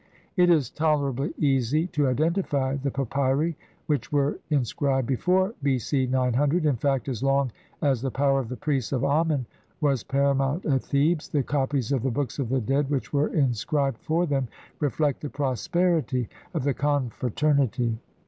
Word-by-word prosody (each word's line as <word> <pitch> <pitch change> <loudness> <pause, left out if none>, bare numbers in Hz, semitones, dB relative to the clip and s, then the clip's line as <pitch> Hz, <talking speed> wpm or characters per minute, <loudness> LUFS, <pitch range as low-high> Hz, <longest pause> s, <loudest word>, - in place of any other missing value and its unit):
It 180 -2 +4
is 150 -8 +3
tolerably 145 -4 0
easy 140 +2 +2
to 150 -6 +1
identify 140 -1 0
the 140 0 -2
papyri 140 +4 0 0.3
which 145 -6 -1
were 145 -1 +1
in 140 -5 +2
scribed 135 +1 0
before 185 - +1
B. 135 -2 +2
C. 130 +2 0
900, 130 +6 +1
in 145 -3 +3
fact, 135 +2 0
as 125 -4 -3
long 135 -1 +2 0.3
as 135 -5 +2
the 135 - -1
power 135 +1 +2
of 125 -4 -4
the 125 - -5
priests 140 -6 -1
of 130 -2 0
Amen 145 -2 +1 0.3
was 140 -6 +1
paramount 140 +3 +1
at 135 -3 +2
Thebes, 150 +3 +1
the 145 -3 +1
copies 135 -2 -1
of 135 -4 +1
the 135 - 0
Books 135 +1 -3
of 130 -5 -1
the 130 0 +1
Dead 135 +5 0
which 140 -1 -2
were 145 +1 +2
inscrib 140 0 +1
ed 125 - -7
for 165 +3 0
them 135 -5 0 0.3
reflect 145 -1 0
the 150 - -4
prosperity 140 - 0 0.3
of - - 0
the 140 0 +1
confratern 140 +1 0
ity. 115 -1 -2
140 Hz, 175 wpm, -26 LUFS, 130-150 Hz, 0.3 s, It